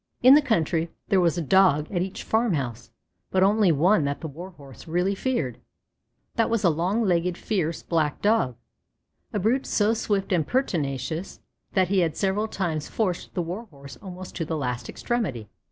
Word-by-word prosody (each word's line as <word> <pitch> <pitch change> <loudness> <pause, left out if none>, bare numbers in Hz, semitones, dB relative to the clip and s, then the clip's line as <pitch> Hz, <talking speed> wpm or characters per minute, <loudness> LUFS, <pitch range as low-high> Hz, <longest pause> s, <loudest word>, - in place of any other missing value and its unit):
In 255 +2 +9
the 295 - +7
country 165 - 0 0.2
there 190 -2 +4
was 170 -1 +2
a 170 - -1
Dog 165 -2 +4
at 175 -3 0
each 190 +1 -4
farm 220 -4 +1
house, 120 -5 -4 0.4
but 190 0 +2
only 205 -1 +4
one 165 +4 +3
that 140 0 -2
the 160 - -5
Warhorse 150 -5 -11
really 180 +4 +1
feared; 195 - -2 0.8
that 230 - +2
was 230 -2 0
a 175 - +5
long 180 +9 0
legged, 180 -2 +1
fierce, 170 -7 -2
black 155 -3 0
Dog, 205 - +2 0.8
a - - -2
brute 225 +7 +1
so 210 +1 +2
swift 205 -3 -1
and 160 -5 +1
pertinacious 160 - -2 0.3
that 185 -2 +2
he 195 -1 +3
had 165 -3 0
several 200 +2 0
times 165 -8 -2
forced 185 -6 -2
the 175 - 0
Warhorse 165 - -8
almost 185 -2 -9
to 170 - -1
the 160 0 -3
last 125 -4 -3
extremity. 170 - -3
180 Hz, 175 wpm, -25 LUFS, 155-205 Hz, 0.8 s, In